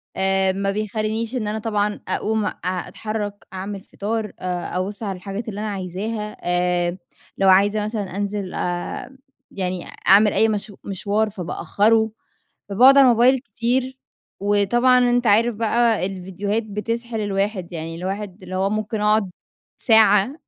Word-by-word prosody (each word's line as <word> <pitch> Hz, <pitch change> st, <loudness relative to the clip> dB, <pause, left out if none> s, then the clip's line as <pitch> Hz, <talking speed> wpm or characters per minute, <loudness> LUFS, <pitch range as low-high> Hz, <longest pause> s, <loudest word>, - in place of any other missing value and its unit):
آآ، 190 Hz, 0 st, +2 dB
ما 195 Hz, +1 st, -1 dB
بيخلّينيش 215 Hz, +3 st, -2 dB
إن 215 Hz, -4 st, -2 dB
أنا 215 Hz, +1 st, -2 dB
طبعًا 210 Hz, -1 st, -1 dB
اقوم 220 Hz, -1 st, 0 dB
أ -, -, -1 dB
اتحرَّك، 205 Hz, +3 st, -4 dB
اعمل 195 Hz, +1 st, -5 dB
فطار، 215 Hz, +2 st, -4 dB
آآ، 180 Hz, 0 st, -3 dB
أبُصّ 200 Hz, +4 st, -3 dB
على 195 Hz, -2 st, -2 dB
الحاجات 195 Hz, +5 st, -6 dB
اللي 205 Hz, 0 st, -6 dB
أنا 215 Hz, 0 st, -2 dB
عايزاها، 205 Hz, +3 st, -4 dB
آآ، 175 Hz, 0 st, 0 dB, 0.4 s
لو 195 Hz, -1 st, +4 dB
عايزة 205 Hz, +3 st, +4 dB
مثلًا 205 Hz, -4 st, -4 dB
أنزل 200 Hz, -2 st, -3 dB
أ 175 Hz, +9 st, -4 dB, 0.3 s
يعني 185 Hz, -2 st, -3 dB, 0.2 s
أعمل 205 Hz, +2 st, +6 dB
أي 225 Hz, -, +4 dB
مشا 205 Hz, -1 st, -3 dB
مشوار 205 Hz, +2 st, -1 dB
فبأخرُّه، 210 Hz, +4 st, +1 dB, 0.6 s
فباقعد 255 Hz, +7 st, +6 dB
على 275 Hz, -, +8 dB
الموبايل 250 Hz, +2 st, +5 dB
كتير. 250 Hz, +3 st, -2 dB, 0.4 s
وطبعًا 225 Hz, +5 st, +3 dB
أنت 245 Hz, 0 st, +1 dB
عارف 225 Hz, +3 st, +4 dB
بقى 225 Hz, -2 st, +2 dB
الفيديوهات 195 Hz, +3 st, -3 dB
بتسحِل 225 Hz, +2 st, -4 dB
الواحد، 195 Hz, -3 st, -2 dB
يعني 165 Hz, 0 st, -5 dB
الواحد 195 Hz, +1 st, -5 dB
اللي 185 Hz, 0 st, -7 dB
هو 195 Hz, +1 st, +1 dB
ممكن 215 Hz, 0 st, -2 dB
اقعد 210 Hz, -2 st, +2 dB, 0.5 s
ساعة 220 Hz, +1 st, +5 dB
205 Hz, 140 wpm, -22 LUFS, 190-220 Hz, 0.6 s, على